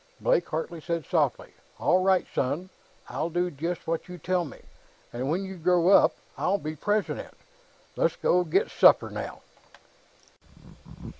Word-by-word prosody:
Blake - - +1
Hartley 160 +1 -4
said 170 -2 -3
softly. - - 0 0.2
"All 185 - +3
right, 190 -1 +3
son; 160 +8 -2 0.4
I'll 165 - -3
do 175 +1 -1
just 165 +4 -4
what 165 +2 -3
you 180 - -7
tell 180 +2 0
me, 145 - -10 0.6
and 125 +3 -3
when 175 +5 0
you 190 -1 -8
grow 175 +1 +3
up, 200 - +6 0.2
I'll 200 - +1
be 155 -4 -5
president.... 205 +7 -2 0.6
Let's - - +1
go 180 0 +2
get 160 - +1
supper, - - +5
now." - - -6
175 Hz, 145 wpm, -27 LUFS, 160-185 Hz, 0.6 s, up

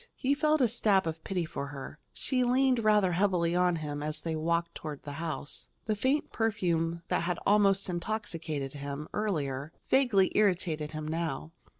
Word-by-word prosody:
He 270 +1 +1
felt 305 +1 +2
a 250 - +5
stab 210 -4 +2
of 160 0 -4
pity 180 -3 -1
for 140 -2 -5
her. 140 -1 -8
She 255 -2 0
leaned 250 -1 +3
rather 210 -3 +4
heavily 175 -2 +2
on 180 -1 +3
him 150 -2 -4
as 150 +1 -2
they 165 0 -2
walked 170 +2 0
toward 150 -3 -7
the 145 - -6
house. 160 -3 -4 0.2
The 215 - 0
faint 265 +8 0
perfume 170 -7 0
that - - +1
had 175 0 -1
almost 200 -1 +4
intoxicated 170 -7 -3
him, 145 +1 -5
earlier, 150 -8 -2 0.2
vaguely 235 -8 +4
irritated 170 -7 +1
him 155 0 -4
now. 160 -1 -3
175 Hz, 170 wpm, -30 LUFS, 155-210 Hz, 0.2 s, a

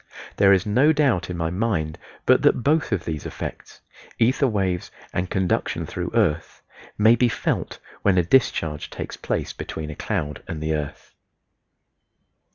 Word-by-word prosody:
There 100 -1 +6
is 95 -2 +4
no 130 +9 +4
doubt 135 - +1
in 90 - -4
my 80 -1 -1
mind 90 -6 -1 0.3
but - - +5
that 120 - +3
both 155 0 +2
of 95 -5 -1
these 80 -3 -4
effects - - -7 0.4
(ether 130 +4 +3
waves 95 -6 -1 0.2
and 90 +1 -1
conduction 95 -2 0
through 90 -1 -4
earth) 85 -8 0 0.3
may 110 +2 +6
be 120 +1 +3
felt - - -2 0.2
when 95 -2 +3
a 90 - +4
discharge 85 - +1
takes - - -6
place - - -3
between 75 -1 -6
a - - -8
cloud 75 0 -3
and 80 - -5
the 80 +1 -1
earth. 75 -2 -5
95 Hz, 160 wpm, -23 LUFS, 80-115 Hz, 0.4 s, There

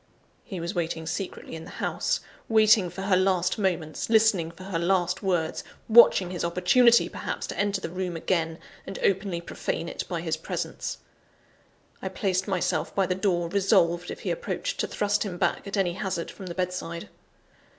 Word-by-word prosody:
He 190 -4 -6
was 170 +3 -3
waiting 165 -2 -2
secretly 185 +4 -5
in 160 - -7
the - - -10
house - - -1 0.3
waiting 215 -4 +5
for 190 +3 -7
her 195 -1 +3
last 185 0 +2
moments; 175 -5 -1
listening 220 -7 +4
for 170 +2 -12
her 185 -3 -2
last 180 +1 +1
words; 175 -5 0 0.2
watching 220 -5 +7
his 180 - -3
opportunity, 180 +8 +5
perhaps, - - -4
to - - -6
enter 205 -1 +1
the - - -4
room 180 -1 -3
again, 165 -1 0 0.3
and 195 - -5
openly 190 -3 +1
profane 170 0 -3
it - - -4
by 170 -3 -2
his 160 -1 -1
presence! 160 - -4 1.0
I - - -3
placed 190 -3 -1
myself 180 -4 -1
by 195 - +3
the 180 - 0
door, 180 -3 0
resolved, 180 -2 +2
if - - -7
he - - -2
approached, - - -3
to - - 0
thrust 205 0 0
him 190 -4 -3
back, 200 - 0
at 200 - -3
any 180 -3 +1
hazard, 185 -3 -3
from 190 - -10
the 170 - -6
bedside. 180 -2 -3
185 Hz, 180 wpm, -27 LUFS, 170-195 Hz, 1.0 s, watching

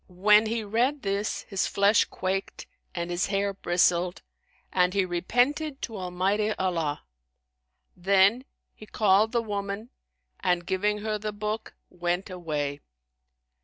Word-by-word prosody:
When 210 +4 +4
he 225 0 -1
read 245 +7 0
this, 200 +1 -1
his 195 -2 -1
flesh 200 +2 +4
quaked 190 +1 -3 0.3
and 170 0 -3
his 175 +1 0
hair 200 0 0
bristled 175 -1 +1 0.5
and 180 +1 +2
he 195 -2 +3
repented 250 - 0
to 225 - -4
Almighty 195 +3 0
Allah: 165 -7 -2 0.9
then 195 +7 +3 0.3
he 215 - -13
called 210 +1 +3
the 235 -1 +1
woman 205 +1 -4 0.5
and, 175 -1 0
giving 210 +3 0
her 215 0 -2
the 215 0 -3
book, 210 +1 -4 0.2
went 175 +2 -2
away. 150 -5 -3
200 Hz, 130 wpm, -27 LUFS, 180-215 Hz, 0.9 s, When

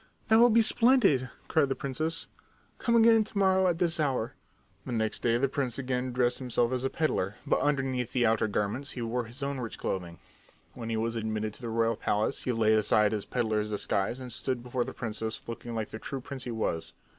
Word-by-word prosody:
"That 220 0 +6
will 240 +1 +7
be 230 0 +5
splendid!" 230 - +4 0.2
cried 150 -4 +2
the 135 - 0
princess. 155 +5 -2 0.5
"Come 235 - +1
again 225 -1 +6
to 210 -1 -9
morrow 190 -1 +4
at 175 -2 +1
this 170 -1 +1
hour." 130 -6 0 0.5
The - - -6
next 110 -1 -1
day 115 -1 +2
the 140 +3 +2
prince 130 -3 -2
again 130 -1 -2
dressed 125 0 +1
himself 120 -2 0
as 130 0 -1
a 135 - +1
peddler, 105 -12 -1
but - - +2
underneath 130 -4 0
the 125 -2 +2
outer 110 -1 +2
garments 105 +7 -2
he 120 - -2
wore 120 +1 -2
his 120 +5 -8
own 140 -1 -2
rich 115 -3 -5
clothing. 85 -3 -4 0.6
When 115 -1 -6
he 115 - -1
was 115 +1 -1
admitted 110 -1 -2
to - - -9
the 120 - -4
royal 115 0 +1
palace 105 +3 0
he 125 - +1
laid 110 -2 +3
aside 105 0 +3
his 105 -2 -2
peddler's 110 -3 -1
disguise 105 +2 -1
and 125 -2 -7
stood 125 -1 -2
before 125 0 -1
the - - -6
princess 110 -1 -3
looking 115 0 -6
like 110 -2 -3
the 110 - -7
true 135 - -5
prince 130 0 -6
he 120 - -4
was. 110 -8 -2
125 Hz, 215 wpm, -29 LUFS, 110-140 Hz, 0.6 s, will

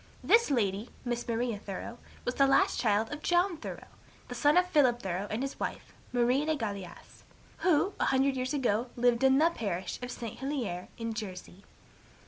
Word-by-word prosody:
This 465 +1 +5
lady, 215 -4 0 0.2
Miss 240 0 -2
Maria 230 -2 -1
Thoreau, 205 +4 -7 0.3
was 245 - 0
the 275 +2 +4
last 270 - +3
child 220 +1 +1
of 295 - -6
John 350 +2 +2
Thoreau, 315 - -7 0.4
the - - -4
son 295 +2 +3
of 360 - +5
Philip 275 -9 +3
Thoreau 190 +2 -2
and 220 +5 -2
his 275 - -5
wife, - - -5 0.2
Marie 250 +3 +2
le 315 +1 +1
Galais, 200 -7 -7 0.4
who, 370 +3 +2
a - - +2
hundred 270 0 +2
years 255 0 -2
ago, 245 -3 0
lived 240 0 +2
in 265 0 +6
the 325 +3 +4
parish 190 - -3
of 245 - -5
St. 230 -3 -6
Helier, 250 -10 -3
in 230 -1 -3
Jersey. 195 -3 -7
245 Hz, 180 wpm, -30 LUFS, 215-275 Hz, 0.4 s, in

